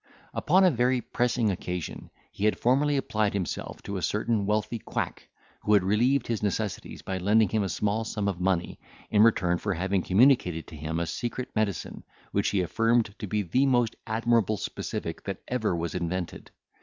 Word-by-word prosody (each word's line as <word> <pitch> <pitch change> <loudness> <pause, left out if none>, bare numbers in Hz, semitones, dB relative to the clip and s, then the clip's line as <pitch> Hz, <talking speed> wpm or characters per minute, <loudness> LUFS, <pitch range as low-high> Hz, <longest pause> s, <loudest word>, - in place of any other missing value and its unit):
Upon 185 +5 +3
a 185 - +6
very 125 0 +2
pressing 120 -2 0
occasion, 90 -2 -5 0.2
he 100 - -3
had 110 - +2
formerly 140 +4 +2
applied 110 -6 0
himself 95 -4 -4
to 100 - -4
a - - -4
certain 105 +1 0
wealthy 110 +2 0
quack, - - -4 0.3
who 105 - +2
had 100 - +4
relieved 120 +7 +2
his 115 -3 -2
necessities 105 -1 -3
by 95 -1 -3
lending 105 +2 +3
him 110 +2 +1
a 95 - -1
small 105 +3 0
sum 105 -2 -2
of 95 -3 -2
money, 90 -2 0 0.3
in 105 - +5
return 90 -6 +4
for 100 -3 -1
having 95 +3 0
communicated 95 - +3
to 80 - -11
him 80 +2 -3
a 85 - 0
secret 120 +9 -4
medicine, 105 -4 -2 0.3
which 100 - +1
he 100 - +1
affirmed 115 +3 +1
to 105 - -4
be 105 +2 0
the 130 +11 +2
most 120 -3 +2
admirable 110 -1 +2
specific - - -4
that - - -5
ever 110 -7 0
was 85 0 -3
invented. 90 0 -4
105 Hz, 180 wpm, -27 LUFS, 95-115 Hz, 0.3 s, a